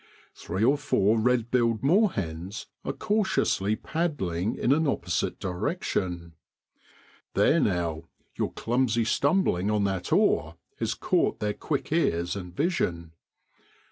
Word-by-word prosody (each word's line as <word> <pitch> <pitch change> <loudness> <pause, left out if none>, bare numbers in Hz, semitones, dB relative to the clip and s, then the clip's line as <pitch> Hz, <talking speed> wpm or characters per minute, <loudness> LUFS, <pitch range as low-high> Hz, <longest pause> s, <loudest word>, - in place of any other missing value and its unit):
Three 95 +5 -3
or 140 +5 +4
four 110 -6 +2
red 120 0 +1
billed 115 -2 +2
moorhens 100 - 0 0.2
are - - -2
cautiously 190 - +1
paddling 110 - -2
in 125 - 0
an 155 +2 +3
opposite 90 - -1
direction. 90 - -3 1.0
There 165 - +4
now! 85 - -1 0.3
your - - -2
clumsy 120 -1 0
stumbling 115 - +1
on 105 -1 +1
that 95 -2 -2
oar 80 +2 +2 0.2
has - - -1
caught - - +1
their 105 -1 -1
quick 145 +4 -3
ears 90 - +1
and 90 -3 -6
vision. 85 - -1
110 Hz, 120 wpm, -27 LUFS, 90-140 Hz, 1.0 s, or